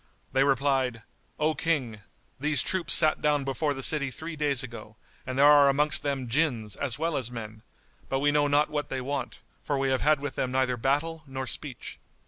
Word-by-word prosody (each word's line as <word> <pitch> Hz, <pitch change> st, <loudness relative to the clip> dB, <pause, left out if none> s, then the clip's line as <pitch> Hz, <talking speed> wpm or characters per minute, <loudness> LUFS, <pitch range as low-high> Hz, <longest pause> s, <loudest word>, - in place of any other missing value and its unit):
They 135 Hz, -, +4 dB
replied, 135 Hz, -4 st, +1 dB, 0.3 s
"O 155 Hz, +1 st, +1 dB
King, 135 Hz, -11 st, -2 dB, 0.4 s
these 150 Hz, -1 st, +1 dB
troops 185 Hz, -4 st, -1 dB
sat 155 Hz, -, +4 dB
down 150 Hz, -1 st, +2 dB
before 140 Hz, +2 st, -1 dB
the 135 Hz, -, -6 dB
city 140 Hz, -1 st, +2 dB
three 160 Hz, +5 st, -7 dB
days 145 Hz, -3 st, 0 dB
ago 115 Hz, -3 st, -10 dB, 0.3 s
and 130 Hz, 0 st, -4 dB
there 140 Hz, -, +6 dB
are 145 Hz, -1 st, +7 dB
amongst 145 Hz, +2 st, +2 dB
them 140 Hz, -3 st, -2 dB
Jinns 115 Hz, -6 st, 0 dB
as 130 Hz, -5 st, -3 dB
well 165 Hz, -1 st, -1 dB
as 125 Hz, -4 st, -2 dB
men; 110 Hz, -2 st, -8 dB, 0.5 s
but 135 Hz, -, 0 dB
we 145 Hz, +2 st, +2 dB
know 145 Hz, 0 st, +2 dB
not 145 Hz, +1 st, +2 dB
what 150 Hz, -1 st, -3 dB
they 135 Hz, -, -3 dB
want, 135 Hz, +1 st, -4 dB, 0.2 s
for 145 Hz, -, -1 dB
we 135 Hz, 0 st, 0 dB
have 130 Hz, -1 st, 0 dB
had 150 Hz, -1 st, +3 dB
with 145 Hz, -1 st, -4 dB
them 130 Hz, -, -2 dB
neither 130 Hz, -1 st, +1 dB
battle 145 Hz, +7 st, -1 dB
nor 130 Hz, 0 st, -5 dB
speech." 130 Hz, -1 st, -4 dB
140 Hz, 200 wpm, -27 LUFS, 130-150 Hz, 0.5 s, are